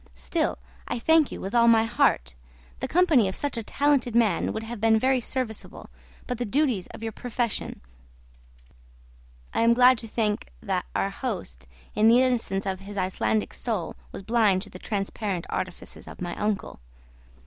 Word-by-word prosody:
Still, 60 Hz, 0 st, -1 dB, 0.3 s
I -, -, -2 dB
thank 320 Hz, +5 st, +3 dB
you -, -, -6 dB
with 195 Hz, -, -5 dB
all 235 Hz, -1 st, +5 dB
my 225 Hz, -1 st, +6 dB
heart: 65 Hz, -, +1 dB, 0.5 s
the -, -, -2 dB
company 320 Hz, -, +4 dB
of 190 Hz, -, -3 dB
such 285 Hz, -2 st, -2 dB
a 230 Hz, -, -2 dB
talented 270 Hz, 0 st, +1 dB
man 220 Hz, -7 st, +2 dB
would 220 Hz, -, -4 dB
have 225 Hz, -1 st, -7 dB
been 225 Hz, 0 st, +5 dB
very 260 Hz, +2 st, +2 dB
serviceable, 245 Hz, -3 st, -5 dB, 0.3 s
but 250 Hz, -2 st, -4 dB
the -, -, 0 dB
duties 245 Hz, -4 st, 0 dB
of -, -, -11 dB
your 225 Hz, -, -2 dB
profession 240 Hz, 0 st, -3 dB, 0.9 s
" -, -, -28 dB
I -, -, +1 dB
am 230 Hz, +1 st, +5 dB
glad 250 Hz, 0 st, +6 dB
to 225 Hz, -, -7 dB
think 210 Hz, -, -1 dB
that -, -, -2 dB
our -, -, 0 dB
host, 60 Hz, +1 st, -5 dB, 0.3 s
in 215 Hz, -, +4 dB
the 235 Hz, +2 st, +7 dB
innocence 230 Hz, -6 st, 0 dB
of 190 Hz, -1 st, -2 dB
his 200 Hz, +1 st, -9 dB
Icelandic 110 Hz, -, 0 dB
soul, -, -, -3 dB, 0.2 s
was -, -, -8 dB
blind 210 Hz, -3 st, +2 dB
to 205 Hz, -, -10 dB
the 185 Hz, -, -10 dB
transparent 195 Hz, -3 st, -3 dB
artifices 185 Hz, -1 st, -5 dB
of -, -, -10 dB
my 175 Hz, -1 st, -4 dB
uncle. 210 Hz, -, -2 dB
220 Hz, 175 wpm, -26 LUFS, 185-240 Hz, 0.9 s, the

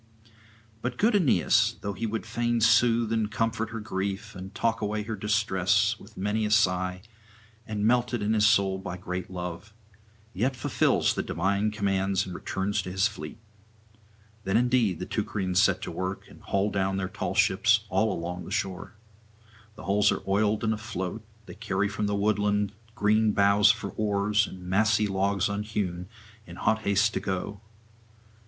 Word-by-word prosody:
But 120 Hz, +1 st, -3 dB
good 220 Hz, +1 st, +3 dB
Aeneas, 115 Hz, -, +3 dB
though 100 Hz, 0 st, -3 dB
he 115 Hz, +4 st, -3 dB
would 110 Hz, +1 st, -3 dB
fain 120 Hz, +1 st, 0 dB
soothe 115 Hz, 0 st, +4 dB
and 110 Hz, -2 st, 0 dB
comfort 115 Hz, 0 st, -1 dB
her 115 Hz, 0 st, -5 dB
grief, 100 Hz, 0 st, -4 dB
and 95 Hz, +1 st, -8 dB
talk 115 Hz, -1 st, 0 dB
away 105 Hz, 0 st, -1 dB
her 110 Hz, +1 st, -4 dB
distress, 105 Hz, +1 st, +1 dB
with 105 Hz, +1 st, -16 dB
many 105 Hz, +3 st, -1 dB
a 105 Hz, -, 0 dB
sigh, 90 Hz, -3 st, +1 dB, 0.6 s
and 105 Hz, -1 st, -2 dB
melted 120 Hz, -1 st, +1 dB
in 110 Hz, +1 st, +1 dB
soul 100 Hz, -3 st, +3 dB
by 90 Hz, -2 st, -6 dB
his 90 Hz, -, -13 dB
great 90 Hz, 0 st, -4 dB
love, 90 Hz, +3 st, -7 dB, 0.6 s
yet 125 Hz, +8 st, 0 dB
fulfils -, -, +1 dB
the -, -, -1 dB
divine 100 Hz, +3 st, 0 dB
commands 100 Hz, -2 st, 0 dB
and 90 Hz, -, -7 dB
returns 100 Hz, +3 st, -2 dB
to 90 Hz, -, -7 dB
his 95 Hz, +3 st, +2 dB
fleet. 95 Hz, -5 st, -8 dB, 1.1 s
Then 95 Hz, +3 st, +1 dB
indeed 120 Hz, -6 st, +2 dB
the 90 Hz, -, -5 dB
Teucrians 95 Hz, -4 st, 0 dB
set -, -, +2 dB
to -, -, -4 dB
work, 95 Hz, +1 st, -4 dB
and -, -, -16 dB
haul 100 Hz, +1 st, 0 dB
down 95 Hz, 0 st, 0 dB
their 95 Hz, -1 st, -2 dB
tall 90 Hz, -, -4 dB
ships 105 Hz, +3 st, +3 dB
all 110 Hz, +1 st, +1 dB
along 90 Hz, +1 st, -4 dB
the -, -, -9 dB
shore. 95 Hz, +1 st, -3 dB, 0.8 s
The -, -, -11 dB
hulls 100 Hz, +1 st, +3 dB
are -, -, -3 dB
oiled 105 Hz, +2 st, +1 dB
and 110 Hz, 0 st, +2 dB
afloat; 110 Hz, -2 st, -5 dB, 0.2 s
they -, -, -10 dB
carry 105 Hz, -2 st, -1 dB
from 105 Hz, +1 st, -2 dB
the 100 Hz, -, 0 dB
woodland 105 Hz, 0 st, +1 dB, 0.2 s
green 110 Hz, 0 st, +2 dB
boughs 100 Hz, +1 st, +5 dB
for 110 Hz, -3 st, +1 dB
oars 105 Hz, +1 st, +1 dB
and 90 Hz, -1 st, -10 dB
massy 105 Hz, +3 st, +2 dB
logs 100 Hz, -1 st, 0 dB
unhewn, 100 Hz, -4 st, -3 dB, 0.4 s
in -, -, -10 dB
hot 110 Hz, -, +1 dB
haste 105 Hz, +1 st, +2 dB
to -, -, -1 dB
go. 95 Hz, +1 st, -4 dB
105 Hz, 170 wpm, -27 LUFS, 95-110 Hz, 1.1 s, boughs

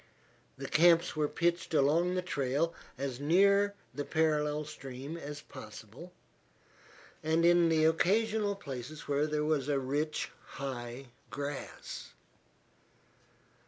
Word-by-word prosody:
The -, -, -5 dB
camps 170 Hz, +1 st, +5 dB
were 150 Hz, -1 st, +1 dB
pitched 170 Hz, +1 st, 0 dB
along 165 Hz, +6 st, +3 dB
the 180 Hz, -, 0 dB
trail 145 Hz, +1 st, 0 dB, 0.2 s
as 135 Hz, -2 st, -3 dB
near 200 Hz, +6 st, +4 dB, 0.2 s
the 145 Hz, -, -3 dB
parallel 150 Hz, -1 st, +1 dB
stream 135 Hz, 0 st, -7 dB
as 150 Hz, -3 st, -7 dB
possible, 110 Hz, -, -11 dB, 1.1 s
and 160 Hz, +2 st, +2 dB
in 175 Hz, -1 st, +6 dB
the 160 Hz, -1 st, +4 dB
occasional 205 Hz, +5 st, +2 dB
places 140 Hz, -4 st, -7 dB
where 145 Hz, +1 st, +1 dB
there 150 Hz, 0 st, 0 dB
was 150 Hz, -3 st, +1 dB
rich, 145 Hz, +2 st, -1 dB, 0.2 s
high 125 Hz, -1 st, -5 dB, 0.2 s
grass. 145 Hz, -, -6 dB
150 Hz, 110 wpm, -32 LUFS, 140-170 Hz, 1.1 s, in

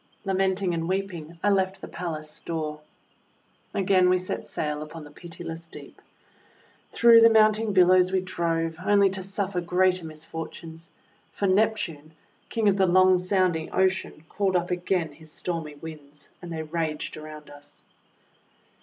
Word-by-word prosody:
Lamenting 190 Hz, -1 st, +1 dB
and 165 Hz, 0 st, -2 dB
weeping, 175 Hz, -4 st, -3 dB
I 205 Hz, -, +4 dB
left 190 Hz, -1 st, +1 dB
the -, -, -8 dB
palace 155 Hz, -3 st, -6 dB
door. 155 Hz, -2 st, -4 dB, 0.9 s
Again 185 Hz, -2 st, +3 dB
we 185 Hz, -, +4 dB
set 185 Hz, 0 st, -5 dB
sail 150 Hz, -1 st, -3 dB
upon 155 Hz, +1 st, -8 dB
the 145 Hz, -, -13 dB
pitiless 165 Hz, 0 st, -8 dB
deep. -, -, -13 dB, 0.9 s
Through 230 Hz, -1 st, +7 dB
the 230 Hz, -, +8 dB
mounting 215 Hz, 0 st, +4 dB
billows 185 Hz, -1 st, +5 dB
we 190 Hz, -, +2 dB
drove, 165 Hz, -3 st, -2 dB
only 200 Hz, -1 st, +4 dB
to 190 Hz, 0 st, -3 dB
suffer 195 Hz, -1 st, -2 dB
greater 180 Hz, +1 st, +2 dB
misfortunes, 160 Hz, +1 st, -7 dB, 0.4 s
for 200 Hz, -, -2 dB
Neptune, 190 Hz, -6 st, 0 dB, 0.4 s
King 225 Hz, -2 st, 0 dB
of 200 Hz, -1 st, +3 dB
the 190 Hz, -1 st, +3 dB
loud 185 Hz, +1 st, +5 dB
sounding 180 Hz, -4 st, +1 dB
Ocean, 190 Hz, -4 st, 0 dB
called 195 Hz, +1 st, -1 dB
up 175 Hz, 0 st, 0 dB
again 180 Hz, -2 st, -1 dB
his 155 Hz, +1 st, -13 dB
stormy 165 Hz, -4 st, -4 dB
Winds, 150 Hz, -2 st, -11 dB
and 175 Hz, -, -8 dB
they 160 Hz, -1 st, -3 dB
raged 155 Hz, -1 st, -3 dB
around 155 Hz, -1 st, -10 dB
us. 145 Hz, 0 st, -14 dB
180 Hz, 145 wpm, -26 LUFS, 160-190 Hz, 0.9 s, the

